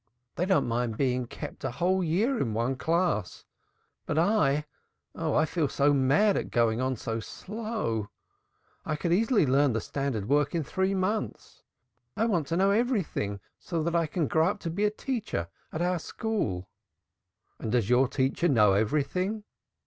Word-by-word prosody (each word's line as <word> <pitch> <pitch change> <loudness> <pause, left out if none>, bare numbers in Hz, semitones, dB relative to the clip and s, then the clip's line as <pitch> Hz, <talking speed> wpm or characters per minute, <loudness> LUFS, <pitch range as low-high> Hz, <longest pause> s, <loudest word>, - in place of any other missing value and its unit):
They 180 - -1
don't 190 - +3
mind 115 -1 -1
being 125 -2 0
kept - - -8
a - - 0
whole 180 +9 +1
year 215 - +1
in 110 -5 -1
one 120 +4 0
class 165 - -1 0.6
but 150 - -1
I 155 -6 +2 0.5
oh, 160 -2 -2
I 155 - +4
feel 160 -1 0
so 145 +1 +2
mad 145 +10 +3
at - - -2
getting 115 0 +2
on 130 0 0
so 115 0 -3
slow. 210 - -4 0.7
I 155 - -2
could 170 +3 0
easily 220 - +3
learn 135 0 +3
the 115 - 0
standard 120 -3 -3
work 145 +5 +2
in 165 - 0
three 190 +6 0
months. 200 +3 -3 0.6
I 225 - +2
want 175 -10 0
to 165 - -1
know 195 +2 +4
everything 200 - 0 0.2
so 165 -3 -3
that 170 +1 -1
I 165 -1 +2
can 165 0 -1
grow 160 +1 +3
up 200 - -1
to 165 - -3
be 200 +5 0
a - - +4
teacher 215 - -3 0.2
at 160 - -2
our 180 0 +1
school." 155 - -3 0.9
"And 110 - -3
does 120 -4 +2
your 125 +3 +4
teacher 135 +6 0
know 105 - +5
everything?" 155 - 0
155 Hz, 170 wpm, -28 LUFS, 125-190 Hz, 0.9 s, know